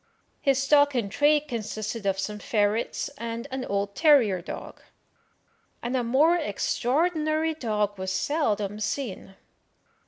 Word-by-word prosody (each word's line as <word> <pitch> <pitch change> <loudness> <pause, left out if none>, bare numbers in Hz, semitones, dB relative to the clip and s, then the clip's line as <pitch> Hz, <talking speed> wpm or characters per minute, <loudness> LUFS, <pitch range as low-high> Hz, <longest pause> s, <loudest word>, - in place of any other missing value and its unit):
His 275 -2 +3
stock 285 +1 +4
in 225 -5 0
trade 295 +7 +3
consisted 215 -3 -4
of 195 -1 +1
some 210 +2 -4
ferrets 210 +1 0
and 230 0 -4
an 260 -1 -3
old 200 -2 -2
terrier 240 - +4
dog, - - -8 1.0
and 240 +2 -2
a 250 - +1
more 280 +9 +4
extraordinary 310 - 0
dog 210 -8 -2
was 190 0 -3
seldom 210 -6 -1
seen. 210 -3 -4
235 Hz, 125 wpm, -26 LUFS, 205-290 Hz, 1.0 s, stock